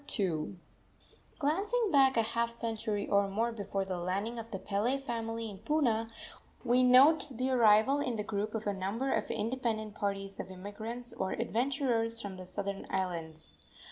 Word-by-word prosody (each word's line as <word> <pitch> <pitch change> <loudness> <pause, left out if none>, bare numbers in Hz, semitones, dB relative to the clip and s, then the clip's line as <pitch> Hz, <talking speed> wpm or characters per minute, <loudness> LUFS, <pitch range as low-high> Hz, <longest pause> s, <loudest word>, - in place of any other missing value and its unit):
II. 175 -4 -1 0.8
Glancing 395 +9 +1
back 270 -3 +5
a 230 - +4
half 230 +1 0
century 225 -3 -2
or 200 0 +3
more 225 +4 0
before 200 -3 -3
the 185 -2 -3
landing 200 +7 -2
of 230 0 -8
the 205 - -4
Pele 210 +7 0
family 230 -3 -4
in 200 -3 -8
Puna, 230 -3 +1 0.5
we 250 +1 +4
note 270 +5 +6
the 255 +2 0
arrival 235 +3 +5
in 250 -4 -1
the 210 - -2
group 210 +1 -3
of 220 - -3
a 205 - 0
number 200 +8 -1
of 220 - -1
independent 220 -2 -2
parties 195 -1 -3
of - - -5
immigrants 220 +6 -5
or 190 0 -2
adventurers 235 -2 0
from 200 -4 -6
the 185 -1 -9
southern 200 +1 -4
islands. 170 -4 -4
225 Hz, 165 wpm, -32 LUFS, 200-245 Hz, 0.8 s, note